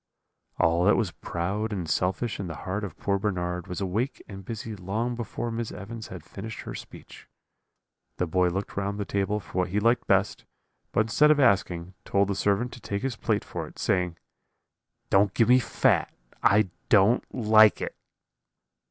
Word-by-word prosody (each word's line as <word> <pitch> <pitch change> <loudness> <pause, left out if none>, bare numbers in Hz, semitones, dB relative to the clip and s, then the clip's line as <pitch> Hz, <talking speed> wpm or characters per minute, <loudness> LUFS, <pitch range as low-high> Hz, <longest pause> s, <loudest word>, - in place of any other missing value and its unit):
"All 85 +2 +3
that 105 - +6
was 105 -7 0
proud 100 +8 -3
and 95 -5 -3
selfish 95 +7 -1
in 100 - -3
the 80 - -6
heart 105 +3 -2
of 95 -6 -6
poor 100 -1 0
Bernard 90 -3 -2
was 90 - -5
awake 105 +8 -1
and 95 -1 -9
busy 110 +1 -6
long 105 +6 -2
before 120 0 -4
Miss 115 -1 -3
Evans 110 +2 -7
had - - -9
finished 110 +3 -8
her - - -7
speech. - - -11 0.9
The 90 - +1
boy 90 +2 +2
looked 95 +3 -3
round 100 +1 -2
the 100 - -2
table 100 +2 -1
for 95 - -5
what 90 - +1
he 100 +3 0
liked 115 +3 +2
best; 95 +1 +2 0.5
but - - +3
instead 115 +7 +4
of 155 -1 +5
asking, 95 -7 +2
told 100 0 +1
the 100 - 0
servant 105 +5 0
to - - -10
take 100 +3 -3
his 135 -3 -1
plate - - -1
for - - -5
it, - - -15
saying: 90 -2 0 0.9
"'Don't 100 0 +4
give 115 - +3
me 125 +1 +7
fat, - - +2 0.3
I 100 -2 +4 0.2
don't 105 +3 +5
like 110 -2 +5
it.' - - -4
100 Hz, 180 wpm, -27 LUFS, 95-110 Hz, 0.9 s, me